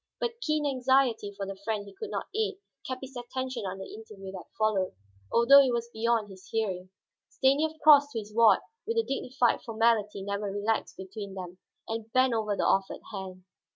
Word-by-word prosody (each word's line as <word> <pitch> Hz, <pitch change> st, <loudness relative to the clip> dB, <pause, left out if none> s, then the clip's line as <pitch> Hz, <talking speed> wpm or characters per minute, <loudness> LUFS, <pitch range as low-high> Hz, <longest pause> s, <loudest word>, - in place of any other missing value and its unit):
But 475 Hz, 0 st, -3 dB
keen 305 Hz, -4 st, 0 dB
anxiety 260 Hz, -5 st, +2 dB
for 200 Hz, 0 st, -5 dB
the 195 Hz, 0 st, -6 dB
friend 205 Hz, +1 st, -3 dB
he 200 Hz, -, -12 dB
could 440 Hz, -, -7 dB
not -, -, -3 dB
aid 435 Hz, -1 st, 0 dB, 0.3 s
kept 255 Hz, 0 st, -4 dB
his 265 Hz, 0 st, -9 dB
attention 245 Hz, -2 st, -4 dB
on 190 Hz, +1 st, -5 dB
the 190 Hz, -, -8 dB
interview 210 Hz, -3 st, -9 dB
that 185 Hz, -2 st, -9 dB
followed, 210 Hz, -, +1 dB, 0.4 s
although 275 Hz, +4 st, +8 dB
it 260 Hz, -3 st, +2 dB
was 235 Hz, 0 st, -2 dB
beyond 225 Hz, -1 st, +1 dB
his 190 Hz, -1 st, -14 dB
hearing. 190 Hz, -5 st, -2 dB, 0.4 s
Stanief 285 Hz, +4 st, +2 dB
crossed 290 Hz, -1 st, +8 dB
to -, -, -3 dB
his 210 Hz, 0 st, -10 dB
ward 230 Hz, 0 st, +6 dB, 0.3 s
with 455 Hz, -, -1 dB
the 455 Hz, -, +4 dB
dignified 255 Hz, -, 0 dB
formality 220 Hz, -3 st, +1 dB
never 200 Hz, 0 st, -3 dB
relaxed 205 Hz, +3 st, -1 dB
between 195 Hz, +1 st, -7 dB
them, 180 Hz, -1 st, -8 dB, 0.3 s
and 225 Hz, 0 st, -5 dB
bent 255 Hz, -1 st, +4 dB
over 215 Hz, -2 st, 0 dB
the -, -, +1 dB
offered 195 Hz, 0 st, +1 dB
hand. 190 Hz, -2 st, -7 dB
225 Hz, 190 wpm, -29 LUFS, 200-260 Hz, 0.4 s, although